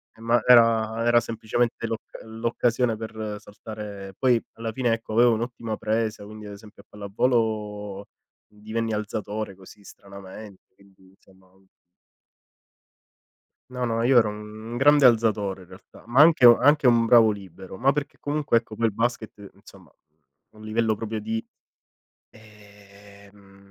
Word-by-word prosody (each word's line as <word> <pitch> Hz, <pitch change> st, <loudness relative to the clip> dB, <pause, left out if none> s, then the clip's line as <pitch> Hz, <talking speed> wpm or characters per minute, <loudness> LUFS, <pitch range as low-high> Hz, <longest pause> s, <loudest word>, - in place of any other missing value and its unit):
Eh, 115 Hz, -, -18 dB
ma 120 Hz, +1 st, +2 dB
era 115 Hz, -2 st, +4 dB
era 120 Hz, 0 st, +5 dB
semplicemente 115 Hz, +1 st, -2 dB
l'occa 115 Hz, 0 st, -7 dB
l'occasione 115 Hz, +1 st, -1 dB
per 110 Hz, -1 st, -6 dB
saltare 105 Hz, -2 st, -10 dB
poi 125 Hz, -3 st, +3 dB
alla 115 Hz, 0 st, -5 dB
fine 120 Hz, -1 st, 0 dB
ecco 115 Hz, -1 st, -6 dB
avevo 120 Hz, +1 st, +4 dB
un'ottima 115 Hz, -1 st, -4 dB
presa, 110 Hz, -1 st, -2 dB
quindi 105 Hz, 0 st, -11 dB
ad 100 Hz, -, -9 dB
esempio 105 Hz, +1 st, -15 dB
a -, -, -57 dB
pallavolo 105 Hz, -1 st, -2 dB, 0.4 s
divenni 110 Hz, +2 st, -5 dB
alzatore, 105 Hz, -1 st, -4 dB
così, 95 Hz, +2 st, -17 dB
stranamente, 100 Hz, +1 st, -13 dB
quindi 95 Hz, -1 st, -24 dB
insomma 95 Hz, -1 st, -25 dB, 2.2 s
No 125 Hz, -1 st, -3 dB
no, 115 Hz, -1 st, -1 dB
io 125 Hz, +1 st, +4 dB
ero 110 Hz, -, +5 dB
un 105 Hz, +2 st, -9 dB
grande 145 Hz, +2 st, +4 dB
alzatore 110 Hz, -5 st, +2 dB
in 90 Hz, -, -16 dB
realtà, 95 Hz, +1 st, -16 dB
ma 120 Hz, +3 st, 0 dB
anche 155 Hz, -5 st, +6 dB
u 120 Hz, -1 st, +9 dB
anche 145 Hz, -1 st, +3 dB
un 120 Hz, -2 st, +4 dB
bravo 115 Hz, -2 st, +5 dB
libero, 95 Hz, -2 st, -10 dB
ma 135 Hz, +5 st, +2 dB
perché 145 Hz, -1 st, -5 dB
comunque 145 Hz, -4 st, 0 dB
ecco 115 Hz, -2 st, -5 dB
quel 115 Hz, 0 st, 0 dB
basket, 110 Hz, -3 st, -4 dB
insomma, -, -, -18 dB
a 75 Hz, +6 st, -32 dB
un 110 Hz, -, -12 dB
livello 110 Hz, 0 st, 0 dB
proprio 110 Hz, 0 st, -5 dB
di 110 Hz, +1 st, -3 dB, 0.9 s
ehm 100 Hz, -2 st, -19 dB
110 Hz, 140 wpm, -24 LUFS, 105-115 Hz, 2.2 s, u